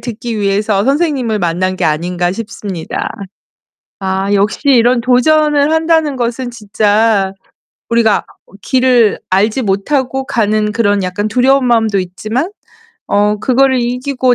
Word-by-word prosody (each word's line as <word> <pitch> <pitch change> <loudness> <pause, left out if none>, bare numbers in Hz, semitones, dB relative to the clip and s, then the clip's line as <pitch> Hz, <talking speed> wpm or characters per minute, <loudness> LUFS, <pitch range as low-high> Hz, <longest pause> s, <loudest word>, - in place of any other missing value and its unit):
듣기 230 -1 -5
위해서 200 0 0
선생님을 275 -6 0
만난 185 +1 -1
게 - - -2
아닌가 175 +3 -1
싶습니다. 200 -5 -5 0.9
아, 190 +1 -1
역시 205 0 +1
이런 245 -2 +4
도전을 290 +4 +2
한다는 320 -3 +1
것은 240 +1 -3
진짜 210 -2 +1 0.6
우리가 230 -2 +2 0.2
어 - - -25
길을 250 -4 +2
알지 210 +7 +1
못하고 260 +7 -1
가는 215 -3 0
그런 205 -3 +1
약간 200 +3 -2
두려운 255 +4 +2
마음도 225 -4 +2
있지만 215 - -3 0.6
어 210 +1 +1
그거를 260 +1 +2
이기고 250 +1 0
225 Hz, 280 characters per minute, -14 LUFS, 200-255 Hz, 0.9 s, 이런